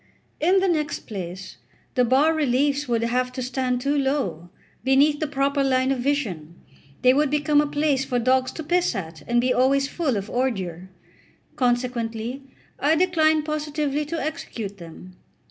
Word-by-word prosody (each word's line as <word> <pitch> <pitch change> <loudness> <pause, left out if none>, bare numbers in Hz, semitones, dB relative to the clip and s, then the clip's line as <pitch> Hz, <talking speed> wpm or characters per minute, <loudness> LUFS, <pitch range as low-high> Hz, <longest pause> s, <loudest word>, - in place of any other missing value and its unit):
In 370 +4 +3
the 385 - +2
next 305 -4 -1
place, 185 - -7 0.4
the 250 - +3
bas 270 +6 +3
reliefs 285 0 +1
would 230 -1 0
have 250 +2 0
to 255 - -4
stand 250 0 -1
too 280 +2 0
low, 265 - -1 0.3
beneath 280 +3 +3
the 310 - -1
proper 280 0 0
line 260 0 +2
of 270 - -1
vision; 215 - -2 0.5
they 255 0 +6
would 295 +1 +2
become 295 0 +3
a 295 - -1
place 290 -2 +1
for 250 -2 -2
dogs 255 +2 +2
to 320 - -6
piss 350 -3 +1
at, 165 -5 -6
and 240 0 +2
be 250 +1 +2
always 275 +2 +3
full 280 -7 -1
of 200 +1 -4
ordure. 190 -9 -2 0.7
Consequently, 245 -1 -1 0.4
I 300 +3 +3
declined 315 -3 +2
positively 300 -1 -2
to 325 +2 -4
execute 225 -9 -5
them. 175 +2 -12
265 Hz, 165 wpm, -24 LUFS, 235-295 Hz, 0.7 s, they